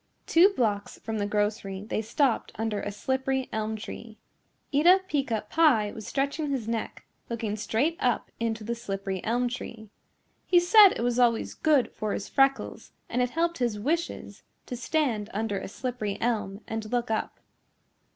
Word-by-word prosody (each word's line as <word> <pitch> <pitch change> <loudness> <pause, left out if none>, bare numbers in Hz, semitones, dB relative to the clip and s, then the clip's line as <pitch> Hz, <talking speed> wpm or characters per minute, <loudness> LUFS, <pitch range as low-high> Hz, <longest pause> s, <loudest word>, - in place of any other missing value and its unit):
Two 345 +4 +6
blocks 215 - -1
from 220 -1 -4
the 205 - 0
grocery 205 -2 -1
they 220 - -1
stopped 235 +3 0
under 220 -2 -2
a 205 - -4
slippery 265 +4 -1
elm 220 0 -1
tree. 220 +1 -8 0.6
Eeta 350 +7 +6
Peeca 255 - -1
Pie 240 -9 +3
was 220 - -9
stretching 280 +2 -1
his 260 -6 -2
neck 230 -1 -4 0.2
looking 225 -3 -2
straight 230 +9 0
up 245 -2 0
into 225 -1 -2
the 235 +2 -2
slippery 195 -5 -4
elm 245 +2 +1
tree. 225 -3 -7 0.6
He 355 - +6
said 400 +3 +8
it - - -3
was 245 0 +1
always 235 -2 +2
good 300 -5 +2
for 215 -2 -3
his 200 - -4
freckles 270 0 +1 0.2
and 245 - 0
it 250 - +1
helped 335 +4 -1
his 235 -4 0
wishes 330 +9 -2 0.2
to 250 - -5
stand 245 -5 -1
under 210 -2 -1
a - - -6
slippery 220 -2 -4
elm 215 -4 -1
and 220 -1 -4
look 240 -2 0
up. 220 - -2
230 Hz, 165 wpm, -27 LUFS, 215-270 Hz, 0.6 s, said